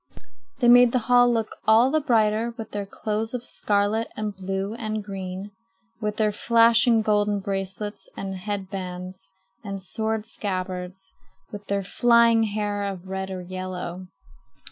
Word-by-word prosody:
They 240 - +4
made 245 0 +7
the - - +4
hall 245 0 +5
look 225 -2 -1
all 230 +4 +6
the 310 +1 +2
brighter 230 -3 +1
with 225 - -7
their 205 -1 -4
clothes 220 +3 -3
of 245 - -5
scarlet 205 +2 +1
and 210 -1 -3
blue 195 +2 -3
and 215 -2 -4
green, 195 0 -6 0.5
with 210 0 -2
their 215 -1 +2
flashing 230 +1 +4
golden 210 -1 +2
bracelets 195 +1 -5
and 195 -1 -4
head 195 0 -4
bands 185 -1 -6 0.3
and 200 -2 -5
sword 220 +3 -2
scabbards, 185 -2 -4 0.4
with 205 -1 -9
their 200 0 0
flying 235 +2 +4
hair 205 -1 -2
of 190 -2 -5
red 190 0 -3
or 185 -1 -5
yellow. 185 0 -6
205 Hz, 145 wpm, -24 LUFS, 190-225 Hz, 0.5 s, made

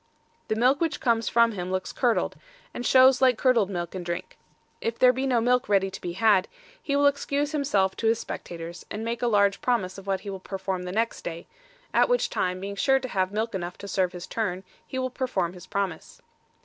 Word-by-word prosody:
The 220 - 0
milk 255 +6 +3
which 330 - 0
comes 230 -5 +1
from 230 0 +4
him 185 -3 -5
looks 185 0 -2
curdled, 240 -3 +1 0.4
and - - -5
shows 260 0 +6
like 255 -3 +5
curdled 235 -6 +3
milk 175 -3 -4
and 185 -2 -5
drink. 170 0 -5 0.5
If 230 0 -2
there 250 0 +6
be 265 +2 -1
no 250 -3 +3
milk 245 0 +2
ready 195 -1 +2
to 195 - -8
be 175 - -4
had, 200 -1 +3 0.3
he 280 -11 -1
will 285 0 +3
excuse 285 +1 +1
himself 205 -11 +1
to 225 - 0
his 225 +1 +3
spectators, 170 -4 -7
and 215 +2 -5
make 230 0 -3
a 245 - +1
large 200 -3 +3
promise 200 -7 0
of 195 - -14
what 195 -1 0
he 200 - -6
will 190 - -6
perform 190 -1 -4
the 180 - -4
next 225 +4 -1
day, 170 0 -6 0.5
at - - +4
which - - +1
time 185 0 -1
being 200 +1 -5
sure 270 +6 +3
to 260 -1 -6
have 190 -3 0
milk 220 +2 -2
enough 175 -2 -4
to 200 - -9
serve 185 -2 0
his 180 0 -7
turn, 190 -3 -3 0.2
he 260 - -5
will 255 0 -1
perform 200 -10 -1
his 180 -2 -12
promise. 195 -5 -4
210 Hz, 225 wpm, -26 LUFS, 185-250 Hz, 0.5 s, shows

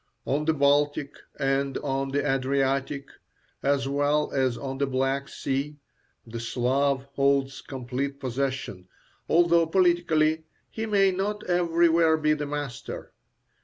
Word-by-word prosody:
On 145 +3 0
the 160 - +3
Baltic 145 0 +2 0.2
and 135 -1 0
on 135 -1 -2
the 145 +2 0
Adriatic, 135 +1 0 0.5
as 135 -1 +1
well 145 +2 +1
as 130 -3 +1
on 135 -1 -5
the 140 - +1
Black 135 +1 -1
Sea, 140 +2 -3 0.5
the 115 0 -7
Slav 130 +4 0
holds 140 -1 +1
complete 135 +1 -4
possession, 130 -7 -3 0.4
although 170 0 +4
politically 160 -3 +2 0.3
he 225 0 -4
may 195 -2 +4
not 205 +3 -2
everywhere 170 -2 +3
be 155 0 +2
the 150 -1 -3
master. 145 -4 -6
140 Hz, 125 wpm, -26 LUFS, 135-160 Hz, 0.5 s, although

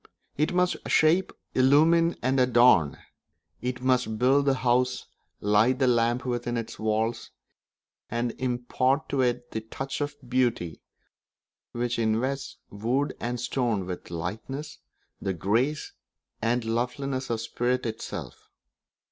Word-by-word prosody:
It 155 +5 +1
must 180 0 +2
shape, 170 +4 +4 0.2
illumine, 160 +6 +4
and 130 +1 +2
adorn; 120 - +5 0.6
it 125 0 -3
must 125 -4 +1
build 135 +4 +3
the 135 -1 +3
house, 125 0 +1 0.4
light 105 +5 +3
the 135 - +2
lamp 120 0 +2
within 120 -1 -2
its 115 - -5
walls, 110 +1 -1 0.8
and 120 +1 -1
impart 130 +4 0
to 140 -1 +1
it 125 -1 -1
that 110 0 -5
touch 135 +4 -4
of 145 0 -2
beauty 120 -9 0 0.9
which 120 0 -2
invests 125 +5 -1
wood 120 +8 -1
and 120 +1 -3
stone 120 -5 -1
with 90 -1 -6
the 85 - -7
lightness, 135 - -5 0.4
the 95 - -1
grace, 120 - 0 0.5
and 120 +2 +1
the 115 - -4
loveliness 130 +3 -2
of 115 -1 -1
spirit 120 +2 -1
itself. 105 - -6
125 Hz, 130 wpm, -27 LUFS, 115-135 Hz, 0.9 s, adorn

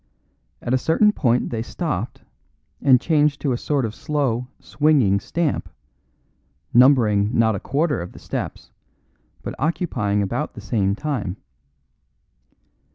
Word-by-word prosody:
At 120 - -1
a 130 - +3
certain 185 - +3
point 125 - +1
they 115 -2 -2
stopped 125 - -4 0.6
and 130 -2 +6
changed 150 -1 +2
to 140 - 0
a - - +1
sort 140 -4 0
of 110 - -4
slow, 125 -3 -1
swinging 140 -10 +2
stamp, 165 +8 -2 1.0
numbering 115 -5 +4
not 110 -1 +4
a 100 - -3
quarter 145 - 0
of 90 - -7
the - - -13
steps, - - -6 0.7
but - - -4
occupying 120 - 0
about 95 - -3
the - - -8
same 100 -3 0
time. 110 -9 -3
125 Hz, 130 wpm, -22 LUFS, 105-150 Hz, 1.0 s, and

